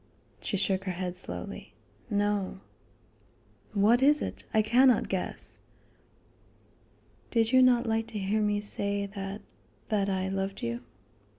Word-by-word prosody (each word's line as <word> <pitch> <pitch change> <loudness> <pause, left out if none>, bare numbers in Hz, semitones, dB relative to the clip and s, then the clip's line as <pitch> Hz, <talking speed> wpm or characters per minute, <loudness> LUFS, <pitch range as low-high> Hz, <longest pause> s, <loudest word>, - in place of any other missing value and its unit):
She 200 - -2
shook 190 -1 0
her 185 - -1
head 180 0 -4
slowly: 180 - -4 0.3
"No." 205 - 0 1.1
"What 215 +5 +4
is 295 +2 +5
it? - - -6
I 215 - +3
cannot 245 +2 +4
guess." 190 -2 -3 1.7
"Did 225 -1 +2
you 260 -1 +6
not 250 -1 +5
like 225 0 0
to 215 - -5
hear 205 +2 0
me 210 -1 +1
say 200 -1 -2
that 195 0 -6 0.5
that 200 -2 +1
I 190 -1 0
loved 195 0 -3
you?" 115 +1 -2
205 Hz, 130 wpm, -29 LUFS, 195-225 Hz, 1.7 s, you